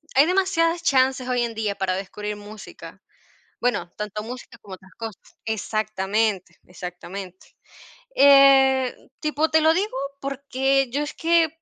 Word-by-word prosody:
hay 275 +2 +7
demasiadas 350 -2 +1
chances 260 -3 +2
hoy 250 -1 +1
en 235 -1 -3
día 215 -2 -2
para 190 -2 -1
descubrir 210 +2 -5
música. 205 0 -11 0.6
Bueno, 175 -8 -1
tanto 210 0 -4
música 240 0 -9
como 195 - -11
otras 190 +1 -20
cosas 225 -4 -9
Exactamente, 215 -2 -1
exactamente. 180 +1 -9 0.6
Eh, 270 -2 +6 0.3
tipo 305 0 0
te 315 0 +4
lo 315 +1 +5
digo, 390 -2 -1 0.2
porque 270 -1 0
yo 285 +4 -1
es 295 - -5
que 330 0 +3
245 Hz, 135 wpm, -23 LUFS, 205-280 Hz, 0.6 s, hay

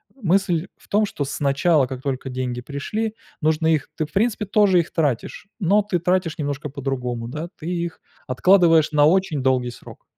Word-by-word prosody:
мысль 190 -6 +1
в - - -23
том, 210 +1 +2
что 145 - -4
сначала, 140 +1 +2
как 130 0 -7
только 135 -1 -3
деньги 125 -1 -3
пришли, 210 - -3 0.3
нужно 155 +1 +1
их 150 -3 -1
ты, 155 - 0
в 150 - -17
принципе, 215 +1 +1
тоже 200 -2 +4
их 170 - -2
тратишь, 145 - -1
но 200 +2 +3
ты 200 -3 -1
тратишь 180 -2 0
немножко 145 -1 -3
по-другому, 125 -4 -3
да, 155 +7 -5
ты 160 - -8
их 170 -1 -3 0.3
откладываешь 165 +3 +4
на 145 -1 +4
очень 165 -4 +2
долгий 130 -2 +1
срок. - - -13
155 Hz, 175 wpm, -22 LUFS, 135-185 Hz, 0.3 s, тоже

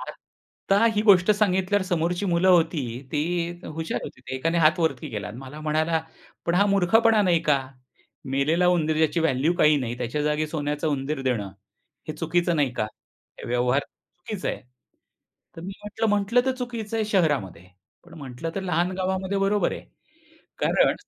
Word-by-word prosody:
आता 200 +3 -3
ही 210 - +1
गोष्ट 195 -2 +5
सांगितल्यावर 205 -1 +2
समोरची 175 +1 -1
मुलं 175 +1 +2
होती 170 -4 +3 0.3
ती 150 - +1 0.4
हुशार 160 +1 -4
होती. - - -10
ते - - -7
एकाने 165 +6 0
हात 160 +2 +4
वरती 160 -6 -1
केला 105 -1 -5
मला 135 +4 -9
म्हणाला, 155 +1 0 0.5
"पण 170 - +1
हा 200 +3 +4
मूर्खपणा 210 +3 +4
नाही 175 -4 +3
का? 150 -3 +3 0.7
मेलेला 155 +6 +2
उंदीर 160 -3 +1
ज्याची 160 +1 +2
व्हॅल्यू 160 0 +2
काही 150 0 +5
नाही 120 -3 -3
त्याच्या 125 +5 -2
जागी 150 +1 0
सोन्याचा 150 0 -3
उंदीर 145 0 -2
देणं 115 -7 -1 0.6
हे - - -2
चुकीचं 170 0 0
नाही 140 -4 +1
का? 110 - -1 0.5
हे - - -8
व्यवहार 125 +3 +2
चुकीचं 180 +6 -8
आहे." - - -3 1.0
तर - - -7
मी 190 +3 -6
म्हटलं, 215 +2 -2
"म्हटलं 205 +3 +2
तर 260 - +2
चुकीचं 230 -3 -4
आहे, 220 - 0
शहरामध्ये 145 - 0 0.4
पण, 170 -1 -15
म्हटलं 135 +3 -6
तर 195 - -2
लहान 180 -1 0
गावामध्ये 190 +1 -1
बरोबर 200 +1 +1
आहे - - -6 0.8
कारण - - +3
165 Hz, 160 wpm, -25 LUFS, 150-195 Hz, 1.0 s, गोष्ट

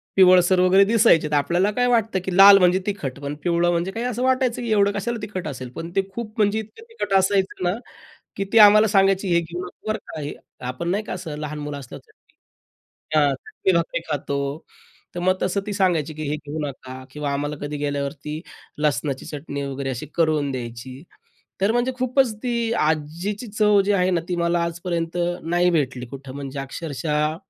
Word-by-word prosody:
पिवळसर 185 -1 +6
वगैरे 185 +2 +6
दिसायचे, 210 -7 +4
तर - - -5
आपल्याला 175 +7 +2
काय 245 +3 +1
वाटतं, 225 -5 +2
की 185 - -2
लाल 195 0 +10
म्हणजे 180 -1 +4
तिखट 145 -11 -4
पण 140 +1 -5
पिवळं 175 0 +2
म्हणजे 175 +2 -1
काही 230 +4 -4
असं 250 0 -2
वाटायचं, 255 -2 +1
की 235 -2 -3
एवढं 200 -1 +4
कशाला 220 +4 -3
तिखट 200 -5 -5
असेल. 130 -3 -6
पण 165 +1 -6
ते 195 - +4
खूप 225 -1 -6
म्हणजे 210 0 +2
इतकं 220 - -10
तिखट 455 - -4
असायचं 190 -1 +1
ना, 175 0 +2 0.6
की 195 - -1
ती - - +5
आम्हाला 215 +1 +8
सांगायची, 195 -2 +3
"हे 170 - +5
घेऊ 170 +2 -6
नका 180 - -13
बरं 215 - -1
का - - -7
हे." 145 - -4 0.3
आपण 130 +7 -3
नाही 200 +4 0
का 215 - -5
असं 175 -4 -6
लहान 150 0 -5
मुलं 145 -1 -5
असल्यावर 130 -3 -10
चटणी, - - -30 0.8
त्या 155 -2 +4
भाकर 135 -2 -4
चटणी 190 - 0
भाकरी 170 0 -1
खातो, 140 -1 -2 0.8
तर - - -3
मग 185 +1 +2
तसं 190 +2 0
ती 205 - -2
सांगायची, 175 -6 +1
की 155 +1 -6
"हे 150 - 0
घेऊ 150 +1 -7
नका" 130 -1 -9
किंवा 145 0 -3
आम्हाला 145 +1 -2
कधी 145 0 -4
गेल्यावर 145 -1 -2
ती 150 +1 -4 0.4
लसणाची 145 -2 -1
चटणी 145 -1 -5
वगैरे 135 0 -4
अशी 130 +2 -4
करून 155 -4 +1
द्यायची. 125 +2 -7 0.6
तर 200 +3 +3
म्हणजे 240 +2 +1
खूपच 255 -1 +2
ती 245 - -1 0.2
आज्जीची 160 +9 -1
चव 210 -1 +3
जी 205 - +2
आहे 185 -1 +2
ना, 170 -2 +1
ती 180 - 0
मला 170 0 +1
आजपर्यंत 170 0 -3 0.3
नाही 175 +2 +2
भेटली 135 -6 -1
कुठं 135 +1 -9
म्हणजे 140 -1 -6
अक्षरशः 150 +2 -2
175 Hz, 195 wpm, -23 LUFS, 145-200 Hz, 0.8 s, लाल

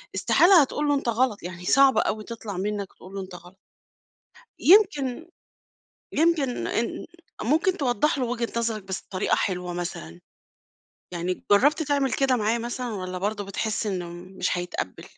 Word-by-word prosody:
استحالة 350 -1 +6
هتقول 295 +2 -1
له 290 - +3
أنت 275 -4 -1
غلط، 235 -2 0
يعني 180 0 -7
صعبة 275 +5 +5
أوي 215 0 -2
تطلَع 215 -4 -7
منَّك 200 0 -3
تقول 185 +1 -14
له 195 - -3
أنت 185 -1 -9
غلط. 175 +2 -14 1.0
يمكن 335 - +4 0.8
يمكن 305 -5 +1
إن 235 - -2 0.4
ممكن 320 - +2
توضح 275 - +1
له 255 - 0
وجهة 235 -1 -2
نظرَك 225 -2 -1
بس 190 0 -5
بطريقة 185 0 0
حلوة 180 -2 -2
مثلًا، 90 - -6 0.9
يعني 175 +1 -3
جربت 290 +10 +4
تعمل 285 -3 0
كده 270 -2 +2
معاه 220 +1 +1
مثلًا 240 0 -4
والّا 185 -2 -5
برضه 205 +2 -2
بتحس 210 +2 -2
إنه 180 -4 -3
مش 180 +1 -3
هيتقبل؟ 175 - -5
220 Hz, 150 wpm, -25 LUFS, 185-270 Hz, 1.0 s, استحالة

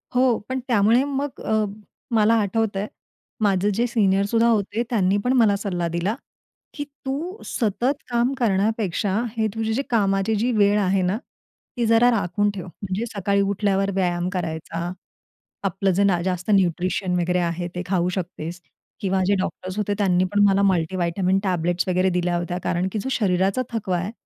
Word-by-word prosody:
हो, 250 -2 +4
पण 260 - -1
त्यामुळे 230 +1 +4
मग 280 -1 -3
अ, 220 -1 +1 0.5
मला 215 +1 +4
आठवतं 205 0 0
आहे 205 - -2 0.5
माझे 200 -1 +2
जे 235 - +2
सीनियर 200 -4 +2
सुद्धा 230 +3 +2
होते 220 0 +1
त्यांनी 200 -5 +2
पण 250 - +2
मला 215 -4 +5
सल्ला 180 -4 -2
दिला 185 +6 0 0.6
की, 290 - -4 0.2
"तू 325 +10 -4
सतत 245 +5 -1
काम 240 +2 +1
करण्यापेक्षा 205 -3 0 0.2
हे 220 - +2
तुझ्या 225 +4 -1
कामाची 200 -2 +1
जी 230 +4 +1
वेळ 205 0 +4
आहे 195 -1 +2
ना, 185 +3 0 0.6
ती 240 - +1
जरा 230 +2 +5
राखून 205 -1 +1
ठेव. 185 - -6
म्हणजे 190 +4 -4
सकाळी 200 0 +1
उठल्यावर 200 0 +1
व्यायाम 175 -2 0
करायचा, 165 0 -3 0.7
आपलं 195 0 0
जे 200 +3 +2
ना 185 -4 +2
जास्त 180 +2 -3
न्यूट्रिशन 185 0 +1
वगैरे 180 +1 +1
आहे 175 0 -1
ते 180 - -2
खाऊ 180 -2 +1
शकतेस" 175 -1 -5 0.4
किंवा 190 -1 +1
जे 200 - +3
डॉक्टर्स 185 0 -4
होते 210 -1 0
त्यांनी 185 -3 +2
पण 205 0 +4
मला 195 0 +3
मल्टीव्हिटॅमिन 185 +1 +1
टॅबलेट्स 175 -1 0
वगैरे 185 +1 +2
दिल्या 175 -1 0
होत्या 175 +1 -3
कारण 180 +1 0
की 215 - -2
जो 265 - -3
शरीराचा 195 +1 +1
थकवा 195 -5 -1
आहे 180 +5 -3
195 Hz, 165 wpm, -23 LUFS, 180-220 Hz, 0.7 s, मला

